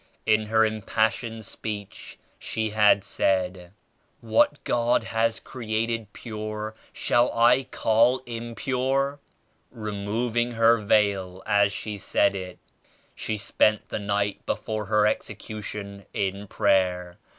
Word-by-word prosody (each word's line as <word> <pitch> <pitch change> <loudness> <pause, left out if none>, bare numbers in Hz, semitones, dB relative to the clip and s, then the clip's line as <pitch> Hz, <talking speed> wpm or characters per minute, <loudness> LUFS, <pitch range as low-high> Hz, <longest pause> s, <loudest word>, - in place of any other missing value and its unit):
In 110 0 +2
her 110 +1 +4
impassioned 110 +1 -1
speech 105 -2 -6 0.2
she 110 -1 -2
had 105 -2 +4
said 90 -3 0 0.5
What 115 +5 +2
God 120 0 +2
has 115 0 0
created 115 -2 -3
pure 110 -1 -5 0.2
shall 120 +1 +2
I 125 +3 +5
call 115 +3 +3
impure?* 130 +4 -1 0.5
removing 110 +3 -2
her 115 0 +5
veil 100 -3 +1
as 100 -1 +3
she 105 0 -5
said 100 - +2
it. 90 -2 -6 0.6
She 110 - -3
spent 105 +1 +1
the - - -3
night 100 0 -1
before 110 -1 -2
her 105 +1 +3
execu 105 0 -2
tion 100 -1 -7
in 100 +1 -2
prayer. 90 -4 +1
110 Hz, 115 wpm, -25 LUFS, 100-115 Hz, 0.6 s, I